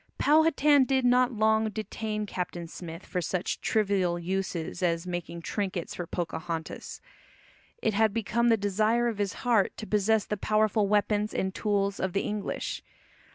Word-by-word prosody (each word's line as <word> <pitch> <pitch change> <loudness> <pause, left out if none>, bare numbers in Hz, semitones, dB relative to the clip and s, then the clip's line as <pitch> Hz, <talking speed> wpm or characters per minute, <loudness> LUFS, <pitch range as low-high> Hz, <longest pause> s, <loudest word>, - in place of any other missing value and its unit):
Powhatan 300 -2 +4
did 265 -1 +1
not 250 +1 +4
long 220 -1 +2
detain 215 0 -4
Captain 175 -3 -4
Smith 165 0 -9
for 180 - -2
such 175 +2 -2
trivial 195 -5 +1
uses 180 -1 -3
as 170 -1 0
making 175 -1 -5
trinkets 190 -2 -3
for 175 - -5
Pocahontas. 165 -1 -5 0.8
It 220 - +2
had 220 +1 +3
become 230 +2 +1
the 225 - +5
desire 215 +4 +1
of 225 -3 -3
his 200 -2 0
heart 230 -5 +2
to 220 - -6
possess 210 0 +2
the 210 - -3
powerful 215 0 +2
weapons 210 +1 +1
and 190 0 -1
tools 200 -2 0
of 190 -1 -1
the 200 - +1
English. 210 -1 -3
205 Hz, 155 wpm, -28 LUFS, 180-220 Hz, 0.8 s, the